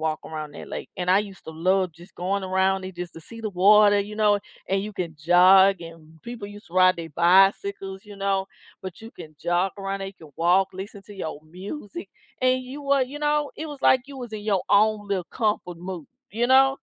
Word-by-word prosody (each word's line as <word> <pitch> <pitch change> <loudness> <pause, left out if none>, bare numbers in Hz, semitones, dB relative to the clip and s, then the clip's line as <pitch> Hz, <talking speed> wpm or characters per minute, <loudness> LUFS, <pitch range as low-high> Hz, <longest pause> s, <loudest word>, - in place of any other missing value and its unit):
walk 155 -1 -1
around 155 -2 -6
that - - -9
lake, - - -6
and 180 0 -1
I 190 - +6
used 195 -3 -10
to - - -7
love 185 +2 +1
just 175 +4 -16
going 195 +2 -2
around 190 0 +1
it 185 -2 -8
just 175 -1 -6
to 165 - -10
see 230 +7 -11
the 215 - -3
water, 205 +2 +6
you 210 +1 -6
know, 210 -1 +3 0.3
and 195 0 +1
you 210 +1 -6
can 170 -5 -5
jog, 185 +3 +6
and 165 -1 -13
people 235 -4 -7
used 205 +1 -12
to 175 - -15
ride 185 -1 +5
their 165 -1 -7
bicycles, 195 +3 +2
you 205 -1 -12
know, 195 -1 0 0.4
but 185 +1 -8
you 225 +1 -10
can 155 -6 -12
jog 175 +2 +1
around, 195 0 -3
they 195 0 -5
can 160 -5 -16
walk, 180 +3 +3
listen 195 +2 -8
to 205 - -11
your 155 -5 -5
music, 205 - -8 0.3
and 255 0 +2
you 270 +3 -8
were 275 -1 +3
you 275 +4 -5
know, 295 -1 0
it 315 - -5
was 290 -3 -9
like 255 -1 +5
you 280 - -10
was 245 -4 -8
in 215 - -5
your 200 -4 0
own 210 0 +3
little 190 -3 -1
comfort 210 -7 -1
mood, 180 -3 -7 0.2
you 235 +2 0
know? 270 +1 +6
195 Hz, 225 wpm, -24 LUFS, 180-215 Hz, 0.4 s, I